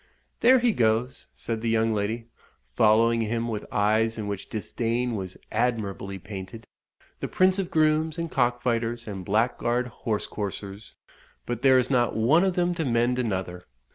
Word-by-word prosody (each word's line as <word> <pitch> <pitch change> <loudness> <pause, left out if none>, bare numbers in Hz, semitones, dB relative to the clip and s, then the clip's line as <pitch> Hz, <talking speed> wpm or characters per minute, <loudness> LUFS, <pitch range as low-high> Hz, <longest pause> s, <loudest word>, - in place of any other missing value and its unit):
"There 255 +2 +6
he 240 -1 +3
goes," 120 - 0
said 115 -1 -4
the 115 - -1
young 115 0 +2
lady, 110 +3 -2 0.5
following 115 - +4
him 115 +1 -1
with 110 -3 -5
eyes 110 +2 +2
in 110 - -4
which 100 -2 -5
disdain 115 +2 -2
was 95 -3 -6
admirably 105 -4 -1
painted 95 +3 -8 0.5
"the - - -3
prince 185 +1 +2
of 185 -2 -2
grooms 155 0 +2
and 165 -1 -3
cock 120 -2 +1
fighters, 120 -1 -1
and 95 -3 -5
blackguard 120 +4 0
horse 110 -2 -3
coursers. 100 0 -6 0.5
But 120 -1 -4
there 130 -1 +6
is 125 +1 +1
not 120 -3 +2
one 140 +11 +4
of 190 -2 +1
them 175 0 +1
to 170 -2 -2
mend 120 -1 +1
another. 95 -6 -3
115 Hz, 165 wpm, -26 LUFS, 105-125 Hz, 0.5 s, There